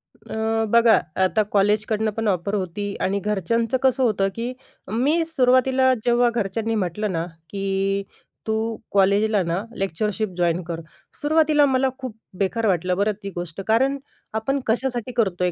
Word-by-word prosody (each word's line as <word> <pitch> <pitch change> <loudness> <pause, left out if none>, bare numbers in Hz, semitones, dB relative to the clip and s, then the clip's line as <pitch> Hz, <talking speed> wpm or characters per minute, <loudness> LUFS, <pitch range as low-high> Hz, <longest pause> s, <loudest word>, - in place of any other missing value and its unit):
अ, 220 0 -2
बघा 235 0 +6 0.2
आता 215 +3 +2
कॉलेजकडनं 215 +2 +2
पण 225 -1 0
ऑफर 200 +2 0
होती, 200 +2 -3
आणि 200 +1 +1
घरच्यांचं 225 +5 0
कसं 260 0 +3
होतं 200 -4 +2
की 235 +2 -3 0.4
मी 290 +9 +2
सुरुवातीला 260 -3 +3
जेव्हा 240 0 +4
घरच्यांनी 225 +1 -1
म्हटलं 200 +1 -1
ना 165 -1 -1 0.2
की, 195 0 -1 0.4
"तू 220 +1 -1 0.2
कॉलेजला 200 +1 +3
ना 170 +4 -2
लेक्चरशिप 205 +3 -1
जॉइन 175 0 +1
कर." 165 0 -5 0.4
सुरुवातीला 300 -1 +4
मला 265 -1 +2
खूप 255 -5 -6 0.2
बेकार 220 +4 0
वाटलं 180 0 +1
बरं 205 +1 +2
ती 200 - -4
गोष्ट. 175 +1 -5
कारण 265 +5 +3 0.4
आपण 270 +6 0
कशासाठी 245 +1 -1
करतोय? 180 -5 +1
215 Hz, 145 wpm, -23 LUFS, 195-240 Hz, 0.4 s, बघा